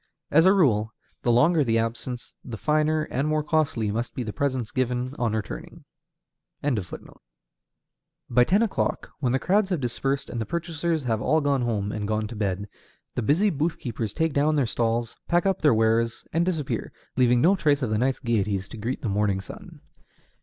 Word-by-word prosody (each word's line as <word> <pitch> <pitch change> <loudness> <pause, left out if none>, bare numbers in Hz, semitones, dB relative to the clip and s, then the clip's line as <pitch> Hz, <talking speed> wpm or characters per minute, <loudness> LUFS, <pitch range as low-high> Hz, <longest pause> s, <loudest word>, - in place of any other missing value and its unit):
As 160 +4 +6
a - - +7
rule, 110 - +2 0.3
the 120 - +2
longer 150 +7 +4
the 115 -3 +1
absence, 115 +2 -3
the 120 -3 -7
finer 155 +2 +1
and 135 +4 0
more 155 0 +1
costly 145 -9 0
must 115 +3 -3
be 125 - -2
the 105 -2 -5
presents 130 -5 -1
given 125 0 -1
on 115 -3 0
returning. 110 -2 -6 2.3
By 125 0 +3
ten 200 - +3
o'clock, 220 - -1
when 130 -4 0
the 130 - +3
crowds 195 +7 +2
have 180 -4 0
dispersed 135 +2 -2
and 120 - -3
the - - -2
purchasers 170 -2 -2
have 110 -3 -1
all 155 +7 +3
gone 140 -3 +1
home 105 -4 -1
and 105 -1 -3
gone 110 0 0
to 115 - -7
bed, 100 -1 -2 0.5
the - - -2
busy 170 - +3
booth 160 +3 -1
keepers 115 -4 -4
take 160 +3 0
down 150 +2 +2
their 140 -3 +2
stalls, 115 0 -1
pack 175 +1 +2
up 195 -2 +1
their 150 - +5
wares, 115 +1 +1
and 170 +3 +1
disappear, 150 -10 -2 0.2
leaving 125 -1 +4
no 180 +10 +5
trace 145 -6 +2
of 115 - -1
the 110 - +1
night's 130 +2 +1
gayeties 100 -4 -1
to - - -9
greet 115 +5 -4
the - - -1
morning 100 -1 +1
sun. 95 - -11
125 Hz, 190 wpm, -25 LUFS, 115-155 Hz, 2.3 s, a